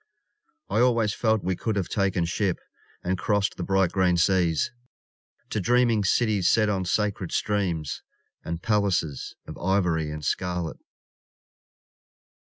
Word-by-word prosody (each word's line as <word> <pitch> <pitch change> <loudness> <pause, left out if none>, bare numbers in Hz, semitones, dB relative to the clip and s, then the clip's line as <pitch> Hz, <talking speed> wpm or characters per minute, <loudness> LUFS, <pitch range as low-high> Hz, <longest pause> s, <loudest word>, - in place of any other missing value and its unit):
I - - 0
always 115 -4 +3
felt 110 -2 +1
we 95 0 0
could 110 +4 -2
have 95 -3 -1
taken 95 -4 0
ship 90 +2 0 0.5
And 90 +1 -1
crossed 105 +1 +1
the - - -6
bright 95 -1 +2
green 90 -2 +2
seas 85 -1 +2 0.8
To 110 - 0
dreaming 120 +1 +3
cities 105 -4 +2
set 110 -2 +3
on 95 -2 -1
sacred 100 0 -1
streams 90 -7 -1 0.4
And 85 0 -5
palaces 95 - 0
Of - - -9
ivory 85 -4 +1
and 75 -1 -6
scarlet. 90 -1 -2
95 Hz, 130 wpm, -26 LUFS, 85-105 Hz, 0.8 s, always